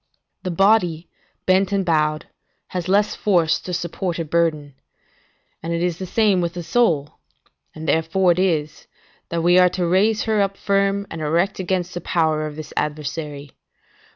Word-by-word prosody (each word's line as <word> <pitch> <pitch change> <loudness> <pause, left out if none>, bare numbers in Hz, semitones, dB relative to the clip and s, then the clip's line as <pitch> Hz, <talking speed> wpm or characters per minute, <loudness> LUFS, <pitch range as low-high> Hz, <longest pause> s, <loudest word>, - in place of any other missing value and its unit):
The 185 - -4
body, 180 -3 +2 0.4
bent 190 +1 +3
and 195 -2 0
bowed, 155 -2 +1 0.4
has 180 -1 -4
less 205 +2 +3
force 175 -6 +2
to 180 - -7
support 175 0 -3
a 165 - -3
burden; 155 -3 0 0.9
and 165 +1 -3
it 170 +1 -1
is 175 -2 -1
the 185 - -5
same 205 -3 +2
with 170 0 -3
the 175 - -5
soul, 165 -9 0 0.6
and 160 0 -7
therefore 165 +5 +2
it 175 - 0
is, 155 -5 -1 0.4
that 170 -1 -2
we 175 +1 +5
are 180 0 +6
to 180 0 -2
raise 205 +5 +2
her 215 -2 +1
up 195 0 -1
firm 200 0 +1
and 165 - -6
erect 170 +6 0
against 180 -1 -2
the 175 - -5
power 155 -2 0
of 150 - -8
this 155 -1 -9
adversary. 150 -1 -4
175 Hz, 170 wpm, -21 LUFS, 160-190 Hz, 0.9 s, are